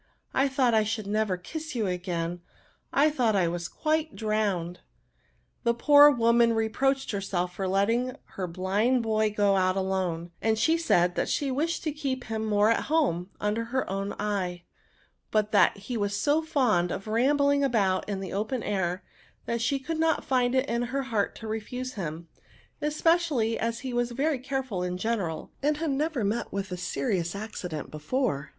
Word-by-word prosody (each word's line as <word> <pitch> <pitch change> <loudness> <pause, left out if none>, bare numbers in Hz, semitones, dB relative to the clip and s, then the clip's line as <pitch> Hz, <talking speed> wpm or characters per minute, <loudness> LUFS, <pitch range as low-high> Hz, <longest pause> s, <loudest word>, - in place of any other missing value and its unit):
I 270 +1 +3
thought 265 -3 +2
I 220 -1 +4
should 215 0 -3
never 205 -2 0
kiss 310 - -7
you 225 -3 0
again; 175 -2 -3 0.5
I 300 +2 +4
thought 240 -7 +1
I 185 -3 +3
was 170 0 -3
quite 315 -1 -1
drowned." 205 -6 -1 0.8
The 235 -1 +2
poor 290 +4 +8
woman 235 -2 +4
re 225 0 0
proached 270 +3 0
herself 190 -3 -2
for 190 +1 -3
letting 230 +7 +1
her 185 -2 -4
blind 200 +8 +1
boj 215 -1 +1
go 205 -1 +3
out 185 0 +2
alone; 185 -3 -1 0.2
she 320 +9 +3
said 180 - +2
that - - -1
she 280 -2 0
wished 320 +6 -1
to 310 - -1
keep 275 -4 -3
him 220 0 -3
more 210 +1 +4
at 230 - 0
home, 260 - +1
under 210 +2 -1
her 260 +3 -2
own 195 +1 -3
eye: 185 -4 -2 0.7
but 215 -1 +1
that 205 - +4
he 220 +5 -5
was 205 -1 -1
so 295 +7 +2
fond 240 - +1
of 195 - -4
rambling 280 +5 +2
about 205 -8 +1
in 195 -2 -2
the 190 - -5
open 220 +5 -2
air, 185 -2 -1 0.4
that 235 0 -2
she 275 +5 +1
could 315 +4 -4
not 320 0 +1
find 250 -1 +2
in 255 -3 +1
her 265 +3 -2
heart 225 -6 -1
to 225 - -8
refuse 250 +4 -4
him; 165 -3 -5 0.5
especiftUy 300 -6 +2
as 230 +1 -2
he 260 -2 -4
waB 240 0 0
very 290 -1 +1
carefiil 260 -7 -3
in 180 0 -2
general, 185 -6 -2
and 295 +1 +1
had 315 -1 -1
never 290 -2 -1
met 220 +4 -1
with 195 -1 -4
a - - -2
serious 175 +1 -2
accident 180 -8 -6
before. 155 - -2
220 Hz, 175 wpm, -27 LUFS, 190-265 Hz, 0.8 s, poor